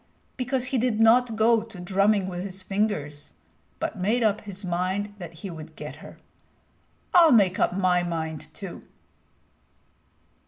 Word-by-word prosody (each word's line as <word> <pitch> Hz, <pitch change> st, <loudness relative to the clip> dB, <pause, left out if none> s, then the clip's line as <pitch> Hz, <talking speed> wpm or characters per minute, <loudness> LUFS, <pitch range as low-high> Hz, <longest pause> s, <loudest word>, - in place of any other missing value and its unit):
Because 255 Hz, 0 st, -1 dB
he 255 Hz, -, +3 dB
did 230 Hz, -2 st, 0 dB
not 230 Hz, +1 st, +5 dB
go 225 Hz, +1 st, +4 dB
to 220 Hz, -5 st, -11 dB
drumming 195 Hz, +2 st, +2 dB
with 180 Hz, -1 st, -4 dB
his 190 Hz, -1 st, -7 dB
fingers, 185 Hz, -8 st, -2 dB, 0.5 s
but 210 Hz, -, -3 dB
made 220 Hz, +6 st, +1 dB
up 210 Hz, -1 st, +2 dB
his 200 Hz, -1 st, -8 dB
mind 185 Hz, +4 st, -2 dB
that 175 Hz, -3 st, -7 dB
he 190 Hz, -, -4 dB
would 160 Hz, -1 st, -10 dB
get -, -, -8 dB
her. -, -, -12 dB, 1.0 s
I'll 335 Hz, -3 st, +7 dB
make 195 Hz, -6 st, +4 dB
up 180 Hz, -, +1 dB
my 180 Hz, -2 st, +3 dB
mind 160 Hz, -3 st, -4 dB
too." 190 Hz, +1 st, -8 dB
195 Hz, 150 wpm, -25 LUFS, 180-225 Hz, 1.0 s, I'll